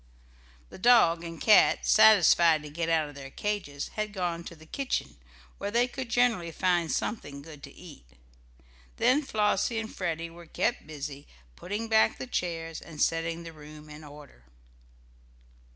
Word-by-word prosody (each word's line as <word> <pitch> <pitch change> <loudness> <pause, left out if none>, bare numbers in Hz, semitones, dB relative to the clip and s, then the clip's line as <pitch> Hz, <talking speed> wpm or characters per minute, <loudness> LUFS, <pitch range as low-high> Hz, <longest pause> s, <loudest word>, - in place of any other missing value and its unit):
The - - -11
dog 185 -7 +5
and 165 -1 -8
cat, 215 -2 +5
satisfied 175 -7 +5
to 150 - -9
get 165 +2 -3
out 160 -2 +2
of 145 - -11
their 135 -1 -9
cages, 180 -6 -4
had 215 -1 -4
gone 175 -3 -3
to 170 - -9
the 160 0 -16
kitchen, 270 - -3 0.4
where 200 - -3
they 240 +3 +2
could 255 -1 -7
generally 235 -8 +1
find 175 -1 0
something 145 -10 -4
good 150 -2 -12
to - - -11
eat. 60 - -14 0.9
Then 275 +4 +3
Flossie 215 -3 0
and 220 0 -5
Freddie 165 -2 -3
were 170 0 -13
kept - - -2
busy 145 -2 -7 0.3
putting 205 - -5
back 220 0 +3
the - - -6
chairs, 165 -8 -4
and 155 -3 -12
setting 165 +1 0
the 165 -1 -9
room 150 0 -13
in 150 +1 -11
order. 145 - -14
170 Hz, 160 wpm, -28 LUFS, 155-210 Hz, 0.9 s, dog